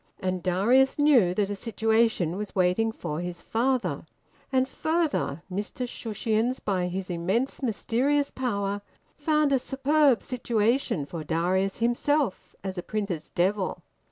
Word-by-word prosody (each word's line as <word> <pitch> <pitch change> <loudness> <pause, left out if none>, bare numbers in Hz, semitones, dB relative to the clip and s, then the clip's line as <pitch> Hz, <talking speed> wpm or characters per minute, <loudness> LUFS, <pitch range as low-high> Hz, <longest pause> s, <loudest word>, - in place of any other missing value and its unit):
And 185 -1 -2
Darius 220 +10 +3
knew 255 -12 +4
that 205 0 0
a - - -2
situation 220 -4 +1
was 205 +1 -5
waiting 185 +4 +2
for 160 -8 -5
his 175 -1 -5
father. 250 +2 -1 0.4
And 260 -1 +2
further, 315 - -1
Mr 210 +6 -3
Shushions, 225 +1 -1
by 185 -3 -1
his 185 +1 -4
immense 190 +13 -1
mysterious 270 +4 +1
power, 205 -5 -2 0.3
found 305 -3 +2
a 265 - +4
superb 270 0 +2
situation 235 - 0
for 160 +2 -6
Darius 180 +5 0
himself 240 +1 0
as 190 -1 -4
a - - -2
printer's 190 -5 -3
devil. 190 +2 0
215 Hz, 130 wpm, -27 LUFS, 185-260 Hz, 0.4 s, knew